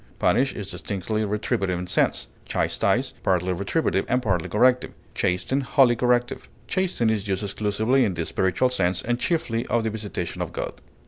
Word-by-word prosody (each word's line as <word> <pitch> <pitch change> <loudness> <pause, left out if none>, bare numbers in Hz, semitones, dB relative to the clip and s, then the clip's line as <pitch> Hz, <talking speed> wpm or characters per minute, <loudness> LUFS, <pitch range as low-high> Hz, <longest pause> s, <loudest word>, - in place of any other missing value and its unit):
Punish 130 +2 +2
is 100 -3 -5
distinctly 105 +2 -3
retributive 100 -3 -1
in 90 - -4
sense; 90 - 0 0.2
chastise, - - 0
partly 95 0 +1
retributive, 100 - 0
and 125 - +3
partly 95 -9 -1
corrective; 125 +3 +3 0.2
chasten, 100 +9 0
wholly 130 -2 +4
corrective. 120 0 0 0.2
Chasten 180 - 0
is 105 -2 -2
used 95 +1 -1
exclusively 110 +6 +1
in 95 - 0
the 85 -1 -2
spiritual 95 +10 +1
sense, 90 -6 +1
and 120 +1 -1
chiefly 120 -9 0
of 120 -1 +1
the 110 - -1
visitation 105 -5 -4
of - - -3
God. - - -4
110 Hz, 165 wpm, -24 LUFS, 95-125 Hz, 0.2 s, wholly